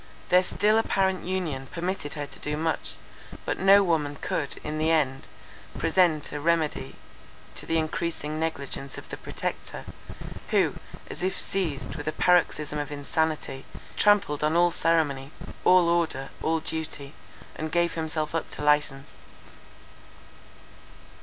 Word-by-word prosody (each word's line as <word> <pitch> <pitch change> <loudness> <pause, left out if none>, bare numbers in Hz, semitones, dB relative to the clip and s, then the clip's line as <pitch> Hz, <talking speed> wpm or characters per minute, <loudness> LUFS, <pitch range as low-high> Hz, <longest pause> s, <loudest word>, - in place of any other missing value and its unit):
Their 180 +1 +6
still 215 +4 +3
apparent 190 -4 +1
union 165 -8 -2
permitted 170 -3 -3
her 145 -1 -3
to - - -8
do 150 0 -2
much; 160 +1 -1 0.5
but - - -2
no 195 +1 +7
woman 155 -5 +1
could, 145 - -2
in 155 0 -3
the 155 +1 +2
end, 140 -5 +1 0.5
present 165 -5 +2
a 145 - -3
remedy 160 0 0 0.6
to - - -3
the 165 - +2
encreasing 155 -1 -2
negligence 140 -4 -3
of - - -10
the - - -5
Protector; - - -5 0.6
who, - - +3 0.3
as - - -8
if 185 +1 -1
seized 150 -7 -2
with 145 0 -6
a - - +2
paroxysm 155 -4 +2
of 145 0 -4
insanity, 145 -1 -1 0.3
trampled 200 -9 +3
on 155 +2 +2
all 175 0 +5
ceremony, 150 -6 +1 0.3
all 180 -1 +6
order, 165 -6 +1
all 160 +1 +1
duty, 155 -3 -4 0.4
and 155 0 -4
gave 170 +1 +2
himself 160 -1 -2
up 165 - -2
to - - -5
license. 145 -2 +2
160 Hz, 140 wpm, -27 LUFS, 145-175 Hz, 0.6 s, no